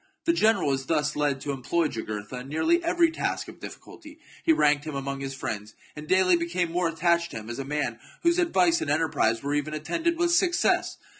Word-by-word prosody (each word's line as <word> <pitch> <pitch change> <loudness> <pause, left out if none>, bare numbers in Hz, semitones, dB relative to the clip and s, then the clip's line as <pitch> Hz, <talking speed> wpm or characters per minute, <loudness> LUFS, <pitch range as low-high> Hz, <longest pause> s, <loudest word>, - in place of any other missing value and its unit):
The 335 - +3
general 215 - +3
was 135 -1 -2
thus 150 -2 0
led 145 -2 0
to 145 - -3
employ 150 +5 0
Ju 115 -6 -5
gurtha 105 +4 -6
in 130 +2 -9
nearly 335 - +2
every 335 -1 +3
task 325 - -2
of - - -12
difficulty; 310 -3 -11 0.3
he 330 - +4
ranked 150 - +3
him 155 -2 -6
among 140 0 -4
his 135 0 -5
friends, 110 -5 -5 0.2
and 150 0 -9
daily 185 0 +4
became 170 0 -1
more 175 0 +1
attached 170 +1 +1
to - - -7
him 110 +1 -7
as 120 - -6
a - - -2
man 135 -4 -2 0.2
whose 340 +1 +3
advice 345 -1 +3
and - - -2
enterprise 140 -8 +1
were 140 +1 -1
ever 145 +1 -1
attended 330 - -1
with 345 0 +2
success. 350 0 +2
155 Hz, 215 wpm, -26 LUFS, -, 0.3 s, he